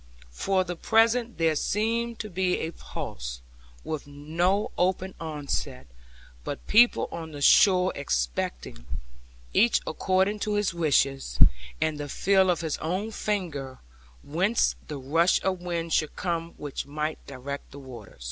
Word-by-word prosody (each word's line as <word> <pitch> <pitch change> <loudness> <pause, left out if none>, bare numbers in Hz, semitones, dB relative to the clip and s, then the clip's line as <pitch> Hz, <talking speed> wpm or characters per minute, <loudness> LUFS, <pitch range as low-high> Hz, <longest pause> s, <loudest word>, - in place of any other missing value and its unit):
For 190 - +1
the 180 -1 -5
present 230 +5 +2
there 165 -1 +2
seemed 230 +7 0
to 215 - -7
be 180 0 +1
a 160 - -3
pause, - - -6 0.4
with 155 -2 -4
no 165 +8 0
open 185 +1 0
onset, 145 -4 -3 0.6
but - - -5
people 235 +3 +5
on 160 -2 -6
the 145 - -7
shore 185 +1 +6
expecting, - - -3 0.7
each 235 +1 +4
according 190 +5 +1
to 210 0 -1
his 205 -4 +1
wishes, 135 - +1 0.4
and 155 -2 0
the 145 0 -5
feel 190 +4 +3
of 175 -1 +1
his 160 -3 -2
own 185 +7 -2
finger, 165 -12 -3 0.5
whence 185 +10 +1
the 150 - -5
rush 165 +7 +3
of 185 -2 0
wind 170 -2 -3
should 155 - +1
come 170 -2 -3
which 145 -2 -5
might 150 +2 -3
direct 140 +1 -6
the 140 - -12
water. 125 -6 -11
165 Hz, 140 wpm, -27 LUFS, 145-190 Hz, 0.7 s, shore